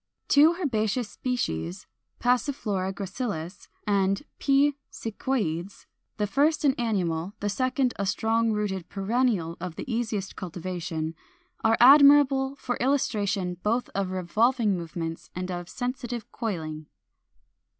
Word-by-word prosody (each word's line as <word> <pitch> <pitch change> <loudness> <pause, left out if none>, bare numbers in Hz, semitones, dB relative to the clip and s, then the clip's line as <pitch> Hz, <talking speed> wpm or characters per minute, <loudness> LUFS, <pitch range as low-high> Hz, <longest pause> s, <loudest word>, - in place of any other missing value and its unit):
Two 310 +4 +6
herbaceous 230 - 0
species, 90 - -3 0.3
Passiflora 240 -7 0
gracilis 195 -3 -5 0.2
and 195 +2 +1 0.2
P. 280 +1 +4 0.2
sicyoides 205 -6 -3 0.3
(the 210 - +1
first 295 +8 +2
an 275 - +5
annual, 185 -5 -1
the 205 - -1
second 255 +3 0
a 200 - 0
strong 225 +3 +1
rooted 200 -4 -2
perennial 200 -5 0
of 180 -2 -5
the - - -6
easiest 225 -5 -2
cultivation), 175 -3 -4 0.5
are 225 0 +4
admirable 275 0 +7
for 245 -3 -3
illustration 205 -9 0
both 230 +5 0
of 195 -1 -1
revolving 210 +5 +1
movements 165 -1 -5
and 185 +1 -3
of 175 -1 -5
sensitive 245 -2 -4
coiling. 160 - -4
210 Hz, 115 wpm, -27 LUFS, 185-250 Hz, 0.5 s, admirable